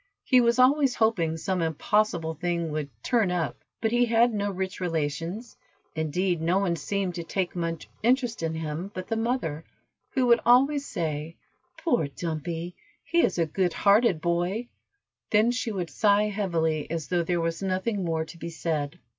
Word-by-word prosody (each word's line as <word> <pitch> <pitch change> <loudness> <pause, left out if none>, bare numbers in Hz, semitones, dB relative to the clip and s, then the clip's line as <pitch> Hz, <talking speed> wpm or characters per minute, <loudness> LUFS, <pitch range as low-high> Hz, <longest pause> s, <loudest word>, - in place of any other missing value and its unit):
He 255 -1 +5
was 235 0 +3
always 265 0 +4
hoping 170 -8 +1
some 185 +2 -1
impossible 165 +1 +1
thing 170 0 -2
would 150 -2 -3
"turn 230 -6 +2
up," 175 -3 -2 0.2
but 225 -1 +1
he 240 +1 +4
had 235 0 +3
no 205 -1 -1
rich 190 0 -4
relations, 165 +6 -3 0.4
indeed 165 +3 0
no 170 +3 +2
one 195 -4 +1
seemed 195 +1 -2
to 170 -1 -5
take 185 +2 -2
much 165 -1 -3
interest 245 -1 +1
in 160 -1 -2
him 160 +3 -4
but 185 0 -6
the 225 - 0
mother, 225 - -1 0.5
who 260 -3 +1
would 235 -1 +5
always 275 +4 +4
say, 155 -1 -3 0.4
"Poor 290 - +1
Dumpy, 165 +3 -4 0.3
he 340 0 +2
is - - +1
a 165 - +2
good 175 +3 0
hearted 200 -4 +4
boy," 175 +8 -1 0.6
then 215 +3 +4
she 245 -2 -2
would 180 -5 -4
sigh 210 0 +3
heavily, 165 -7 -1
as 165 -2 -4
though 175 -1 +2
there 175 +1 0
was 165 +1 -2
nothing 190 +2 -1
more 160 -2 -1
to 165 +1 -12
be 170 - -5
said. 155 -3 -3
180 Hz, 170 wpm, -27 LUFS, 165-225 Hz, 0.6 s, He